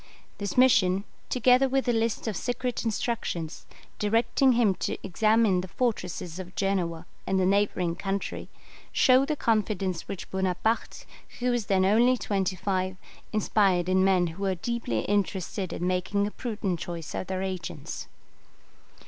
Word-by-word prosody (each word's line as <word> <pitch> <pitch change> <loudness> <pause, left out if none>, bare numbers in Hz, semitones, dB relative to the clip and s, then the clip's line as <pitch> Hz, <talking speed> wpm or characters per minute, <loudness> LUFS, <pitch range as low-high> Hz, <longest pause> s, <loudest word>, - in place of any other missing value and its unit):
This 200 +1 -4
mission, 200 -7 +5 0.3
together 255 +1 +4
with 270 0 0
a 240 - +3
list 225 0 0
of 215 - -1
secret 245 +2 -2
instructions, 225 - -3 0.3
directing 230 +5 +3
him 230 -5 +3
to - - -2
examine 215 0 +3
the 185 - -7
fortresses 180 -6 -2
of 185 0 -8
Genoa 180 -4 -1 0.2
and 190 - +2
the 185 - +2
neighbouring 185 -3 +1
country, 195 +1 -4 0.4
show 260 0 +5
the 305 +1 -1
confidence 205 - 0
which 190 - -7
Bonaparte, 190 +4 -1 0.3
who 250 0 +1
was 240 -4 -1
then 190 -1 +3
only 235 +6 +4
twenty 195 -4 -1
five, 185 0 -1 0.3
inspired 195 -4 +2
in 185 0 +3
men 190 -2 +4
who 170 +3 -6
were 190 -1 +1
deeply 180 - -2
interested 195 -2 -1
in 175 - -3
making 185 +3 0
a 210 - -3
prudent 205 -8 -3
choice 170 -1 -6
of - - -4
their 190 0 -2
agents. 185 -3 -5
195 Hz, 150 wpm, -27 LUFS, 185-230 Hz, 0.4 s, mission